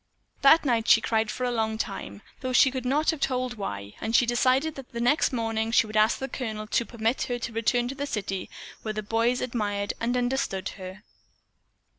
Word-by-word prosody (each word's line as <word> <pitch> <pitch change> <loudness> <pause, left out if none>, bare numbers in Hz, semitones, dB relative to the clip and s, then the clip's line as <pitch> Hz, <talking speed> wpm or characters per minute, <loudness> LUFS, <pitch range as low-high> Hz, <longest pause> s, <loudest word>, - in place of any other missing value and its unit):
That 300 +3 +6
night 235 -4 +1
she - - +7
cried 220 -1 0
for 255 - -4
a 250 - +1
long 220 -2 -1
time, 150 - -5 0.2
though 255 -1 -3
she 265 +1 +6
could 260 -1 -4
not 300 +5 +2
have 320 - -6
told 255 -2 -1
why, 100 - -5
and 225 +1 -1
she 245 - +5
decided 255 +5 +2
that 270 -3 -10
the - - -33
very - - 0
next 300 - +1
morning 225 -2 -1
she 230 - +4
would 215 0 -9
ask 215 +1 +4
the 265 - -4
Colonel 220 -6 -4
to 235 +2 0
permit 230 +1 -1
her 245 - -2
to 235 -1 -5
return 240 +2 +1
to 255 - -4
the 285 +1 -4
city 195 -6 -3 0.3
where 215 -1 -4
the 215 - -3
boys 230 +4 +1
admired 205 -5 -2
and 240 +2 0
understood 245 -6 -1
her. 190 +2 -9
235 Hz, 215 wpm, -26 LUFS, 215-255 Hz, 0.3 s, she